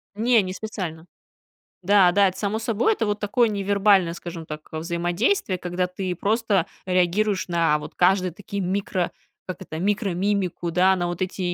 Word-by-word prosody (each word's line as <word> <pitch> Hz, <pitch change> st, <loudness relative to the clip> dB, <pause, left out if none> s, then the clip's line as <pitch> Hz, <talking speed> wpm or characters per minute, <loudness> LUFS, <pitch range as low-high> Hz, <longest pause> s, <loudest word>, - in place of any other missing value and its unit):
Не, 230 Hz, +1 st, +4 dB
не 185 Hz, -1 st, -4 dB
специально. 185 Hz, -6 st, -6 dB, 0.8 s
Да, 190 Hz, -1 st, +5 dB
да, 200 Hz, 0 st, +5 dB
это 185 Hz, -, -11 dB
само 210 Hz, +1 st, -1 dB
собой, 230 Hz, -, +1 dB
это 385 Hz, -, -1 dB
вот 205 Hz, 0 st, -1 dB
такое 225 Hz, +3 st, +2 dB
невербальное, 200 Hz, -3 st, +2 dB
скажем 170 Hz, -1 st, -8 dB
так, 150 Hz, 0 st, -7 dB
взаимодействие, 175 Hz, -, 0 dB
когда 180 Hz, 0 st, -2 dB
ты 180 Hz, 0 st, -4 dB
просто 205 Hz, -2 st, +1 dB, 0.2 s
реагируешь 185 Hz, +2 st, +1 dB
на 165 Hz, -3 st, +2 dB
вот 150 Hz, +1 st, -9 dB
каждые 185 Hz, 0 st, +3 dB
такие 200 Hz, +2 st, -5 dB
микро, 185 Hz, -1 st, -1 dB, 0.3 s
как 185 Hz, -, -7 dB
это, 160 Hz, -4 st, -6 dB
микромимику, 195 Hz, -2 st, -1 dB
да, 185 Hz, +2 st, +4 dB
на 175 Hz, -1 st, -1 dB
вот 175 Hz, +1 st, -5 dB
эти 180 Hz, -1 st, -2 dB
185 Hz, 160 wpm, -23 LUFS, 175-205 Hz, 0.8 s, Да